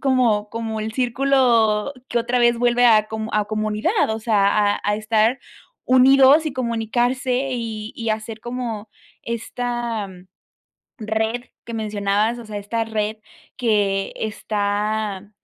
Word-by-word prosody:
como 240 -6 +2
como 225 -1 -4
el 220 +1 -4
círculo 245 -3 +2 0.2
que 240 - 0
otra 240 +2 0
vez 240 -1 +4
vuelve 245 0 +3
a 215 -2 +5
com 220 0 -5
a 210 -1 +2
comunidad, 215 - 0
o 220 - -2
sea, 215 -3 +2 0.3
a - - -10
a 205 0 0
estar 220 +3 +1 0.5
unidos 270 +4 +6
y 305 - -2
comunicarse 245 +2 -1
y 225 -3 -4
y 230 -1 -4
hacer 215 0 -4
como 240 -3 -5 0.3
esta 235 -2 -3 0.9
red 220 +2 -2 0.2
que 235 - -8
mencionabas. 210 +1 0
O 235 - -9
sea, 210 -1 -6
esta 225 +3 -2
red 220 -1 -2 0.4
que 205 -5 +1
está 210 -1 -2
225 Hz, 130 wpm, -21 LUFS, 215-245 Hz, 0.9 s, unidos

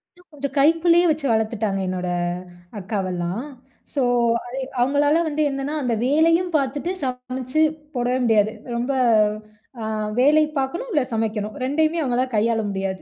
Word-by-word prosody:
இன்னும் 360 -1 -24
கொஞ்சம் 280 -2 -5
கைக்குள்ளேயே 330 +4 +4
வச்சு 305 -2 0
வளர்த்துட்டாங்க. 220 -2 0
என்னோட 185 0 -3 0.7
அக்காவெல்லாம். 185 -1 -3 0.5
ஸோ, 280 - 0 0.4
அது 245 +2 -7 0.2
அவுங்களால 285 +4 +3
வந்து 305 0 -1
என்னன்னா 275 +2 -3
அந்த 245 -2 0
வேலையும் 330 +6 +3
பார்த்துட்டு 285 +5 -2
சமைச்சு 255 +2 -2 0.3
போடவே 245 +1 0
முடியாது. 215 -2 +3 0.2
ரொம்ப 240 +3 -1 0.9
அ - - -3 0.3
வேலை 300 +4 +5 0.2
பார்க்கணும், 340 - -3
இல்ல 300 - +3
சமைக்கணும். 215 -1 -2
2யுமே 315 +5 +1
அவுங்களால 255 -3 +1
கையாள 225 +1 +2
முடியாது. 190 -1 -3
255 Hz, 130 wpm, -22 LUFS, 220-300 Hz, 0.9 s, வேலை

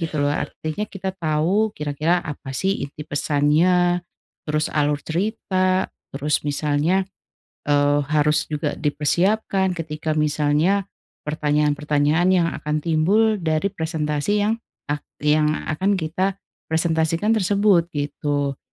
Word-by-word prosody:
gitu 165 -2 -3
loh, 145 0 +2
artinya 155 +6 -3
kita 190 -1 -4
tau 175 +6 +1
kira-kira 155 +4 0
apa 140 -2 -6
sih 195 -4 0
inti 150 +2 -9
pesannya, 165 +5 +2 0.5
terus 155 0 0
alur 145 -1 +1
cerita, 185 +1 0 0.2
terus 145 +2 0
misalnya, 150 +6 +1 0.6
eee, 145 0 +3
harus 150 0 +2
juga 150 -1 -1
dipersiapkan 190 +6 +1
ketika 155 -1 -4
misalnya 150 +6 +1 0.4
pertanyaan-pertanyaan 150 +2 +1
yang 170 -2 +3
akan 150 0 -3
timbul 200 +7 +2
dari 160 +3 0
presentasi 160 +3 -1
yang 225 +2 0 0.3
ak 145 - -1 0.2
yang 150 +1 +3 0.2
akan 195 +6 +1
kita 185 +3 -1 0.3
presentasikan 160 +4 +1
tersebut 200 -4 +3
gitu. 145 -1 -2
155 Hz, 110 wpm, -22 LUFS, 150-185 Hz, 0.6 s, eee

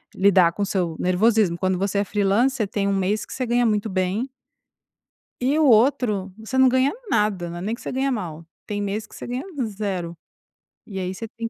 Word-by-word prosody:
lidar 190 -3 +5
com 205 - -2
o - - +1
seu 180 -5 -1
nervosismo, 185 -1 +2
quando 185 0 0
você 200 +1 0
é - - +2
freelancer 210 +4 +1
tem 200 0 -1
um 200 - +1
mês 200 +3 0
que - - -9
você 255 - -2
ganha 240 0 +2
muito 210 -1 +1
bem 190 +7 -1 1.1
e 275 +5 +2
o 315 - +4
outro 220 -5 +3
você 220 +4 -5
não 260 0 +7
ganha 260 +2 +3 0.2
nada, 210 -5 +1
né, - - -6
não - - -5
é - - -6
nem 220 +4 -2
que - - -11
você - - -5
ganha 270 +1 0
mal, 165 -7 -5 0.2
tem 205 -1 -3
mês 205 +2 -3
que - - -17
você - - -8
ganha 250 +5 -4 0.2
0, 195 -5 -4 0.7
e 195 -3 -6
aí 185 0 -3
você 225 +4 -6
tem 230 0 -6
205 Hz, 220 wpm, -23 LUFS, 190-235 Hz, 1.1 s, não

